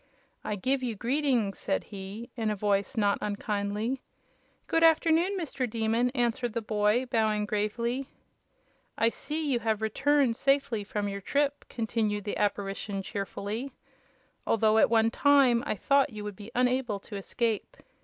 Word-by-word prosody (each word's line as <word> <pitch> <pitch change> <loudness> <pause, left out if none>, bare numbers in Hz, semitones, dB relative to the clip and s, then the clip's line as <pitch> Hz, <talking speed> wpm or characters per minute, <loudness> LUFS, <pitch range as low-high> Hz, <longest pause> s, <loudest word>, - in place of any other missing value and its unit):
"I 210 - -2
give 260 +7 0
you 240 -3 -2
greetings!" 245 -3 0
said 195 - -1
he, 200 +3 -8
in 225 -3 -1
a 210 - 0
voice 200 +1 0
not 205 -2 +2
unkindly. 210 +4 -2 0.6
"Good 330 - +1
afternoon, 330 +4 +4
Mr. 275 -7 -3
Demon," 225 +2 +1
answered 240 -1 0
the 230 - -1
boy, 210 +3 +2
bowing 220 -4 +1
gravely. 235 +5 -1 0.9
"I 225 - +4
see 305 +5 -4
you 245 - +2
have 220 -2 0
returned 245 +3 +2
safely 275 -6 +1
from 205 0 -3
your 200 0 -4
trip," 285 +6 0
continued 220 -3 -1
the 205 - -3
Apparition, 200 -1 -2
cheerfully, 205 +6 -4 0.7
"although 220 0 +4
at - - +5
one 225 0 +3
time 270 -4 +4
I - - 0
thought 275 +7 +3
you 215 -4 -7
would 205 -1 -5
be 205 +3 -10
unable 250 -4 +1
to 205 - -9
escape. 220 +2 -2
225 Hz, 150 wpm, -29 LUFS, 210-255 Hz, 0.9 s, at